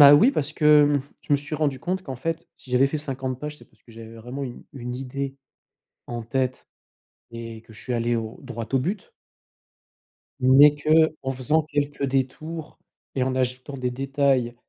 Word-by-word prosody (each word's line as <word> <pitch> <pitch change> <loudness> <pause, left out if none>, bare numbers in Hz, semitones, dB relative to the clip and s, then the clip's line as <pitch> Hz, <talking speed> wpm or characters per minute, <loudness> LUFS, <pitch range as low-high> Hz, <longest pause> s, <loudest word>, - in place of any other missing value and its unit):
Bah 145 0 +11
oui, 225 - +7
parce 155 - -2
que 155 - -3 0.3
hem, 140 - -1 0.2
je - - -2
me 145 - +7
suis 145 +3 -6
rendu 145 -4 0
compte 185 +4 -2
qu'en 135 -7 -6
fait 165 +6 -3
si 130 - -16
j'avais 125 +2 +5
fait 150 +2 -2
50 130 -3 -4
pages, 150 0 -5
c'est - - -15
parce - - -30
que 115 - -17
j'avais 115 0 -10
vraiment 125 +5 -6
une 125 -3 -6
une 125 -1 -5
idée 135 +1 -4 0.7
en 120 -1 -4
tête 130 +2 -2 0.6
et 115 -1 -8
que 115 - -16
je 110 - -12
suis 125 - -3
allé 120 0 +1
au 110 0 -5
droit 115 -4 -6
au 135 - +4
but. 180 +10 -3 1.3
Mais 140 +3 +7
qu'en 155 -1 +2
faisant 135 +5 +1
quelques 145 -1 -2
détours 140 +4 -2 0.4
et 130 - 0
en 130 0 0
ajoutant 130 +2 -2
des 125 -1 -1
détails 135 -2 +1
135 Hz, 190 wpm, -25 LUFS, 125-145 Hz, 1.3 s, Bah